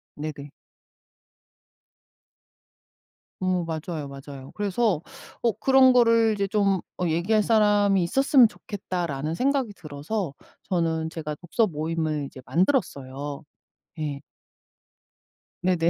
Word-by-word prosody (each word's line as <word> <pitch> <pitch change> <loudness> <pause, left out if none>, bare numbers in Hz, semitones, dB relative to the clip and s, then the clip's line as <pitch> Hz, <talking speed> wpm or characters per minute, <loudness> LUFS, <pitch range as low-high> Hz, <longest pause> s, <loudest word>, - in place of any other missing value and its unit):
네네. 145 -1 -6 2.9
어머 185 -1 0
맞아요 160 -2 -4
맞아요. 140 -1 -10
그래서 205 -3 +1 0.4
어 235 - +4
'그런 265 -1 +6
거를 230 -2 +5
이제 200 -1 -1
좀 195 -2 +1 0.2
어 180 - +1
얘기할 180 +7 +2
사람이 205 -3 +3
있었으면 265 - +5
좋겠다.'라는 170 -8 -4
생각이 265 -2 +1
들어서 155 +3 -4 0.3
저는 160 -3 -1
제가 150 -2 -5
독서 180 +8 0
모임을 155 -2 -2
이제 135 -1 -10
만들었어요. 145 - -1 0.6
예. 145 -2 -3 1.4
네네. 175 -2 +2
175 Hz, 235 characters per minute, -25 LUFS, 150-210 Hz, 2.9 s, 그런